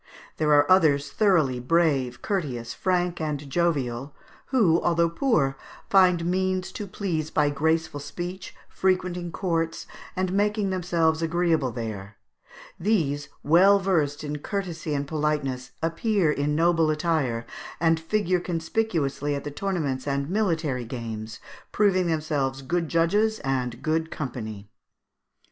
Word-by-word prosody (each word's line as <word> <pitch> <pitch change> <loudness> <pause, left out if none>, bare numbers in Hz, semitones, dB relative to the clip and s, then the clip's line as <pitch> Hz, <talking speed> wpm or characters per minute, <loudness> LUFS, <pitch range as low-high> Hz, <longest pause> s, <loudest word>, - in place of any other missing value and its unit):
There 155 -1 +1
are 145 0 +6
others 145 -6 +4
thoroughly 165 - +2
brave, 135 -3 +1
courteous, 130 - -2
frank, 180 -2 0
and 150 -2 -3
jovial, 140 -5 -1 0.3
who, 200 -11 +3
although 170 -1 +2
poor, 170 - +1 0.4
find 180 -3 +5
means 185 +1 0
to 205 +1 -6
please 170 -5 -3
by 150 -2 +2
graceful 160 +1 0
speech, 175 +5 -6
frequenting 180 -2 -1
courts, 165 -2 -2 0.3
and 185 0 -1
making 205 0 +1
themselves 165 -3 +1
agreeable 165 -5 +1
there; 110 -3 -6 0.6
these, 155 -8 0
well 185 +6 +6
versed 160 -7 0
in 150 0 -4
courtesy 170 -4 -3
and 140 0 -2
politeness, 145 -4 -1
appear 165 +1 +1
in 145 0 0
noble 165 0 +3
attire, 150 -7 0 0.3
and 165 0 +3
figure 180 +1 0
conspicuously 165 -5 -1
at 140 - -4
the 145 - -5
tournaments 145 -6 -2
and 140 +2 -1
military 165 - 0
games, 115 -2 -6 0.3
proving 185 -4 +2
themselves 150 -5 -1
good 165 +3 -1
judges 205 +7 +2
and 130 -2 -2
good 160 +1 0
company." 110 -9 -6
160 Hz, 125 wpm, -25 LUFS, 140-180 Hz, 0.6 s, are